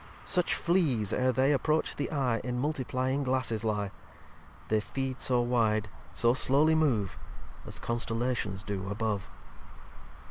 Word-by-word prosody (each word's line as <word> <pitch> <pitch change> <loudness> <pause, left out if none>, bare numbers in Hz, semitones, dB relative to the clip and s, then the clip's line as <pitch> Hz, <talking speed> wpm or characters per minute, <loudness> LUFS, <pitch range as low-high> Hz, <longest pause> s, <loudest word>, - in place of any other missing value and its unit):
Such 180 -2 +2
Fleas, 150 - +1
ere 130 0 +2
they 130 +3 +3
approach 155 +3 +1
the 145 - -3
Eye, 130 -7 0
In 125 0 -2
Multiplyiug 130 -1 -1
Glasses 125 -4 0
lye. 105 -3 -1 0.8
They 110 - +3
feed 130 +3 -4
so 125 -2 +2
wide, 110 -3 +1 0.2
so 120 +7 +3
slowly 140 +5 +4
move, 130 - +1 0.5
As - - -5
Constellations 115 -4 -1
do 100 -1 -4
above. 105 -1 -2
125 Hz, 130 wpm, -30 LUFS, 110-135 Hz, 0.8 s, slowly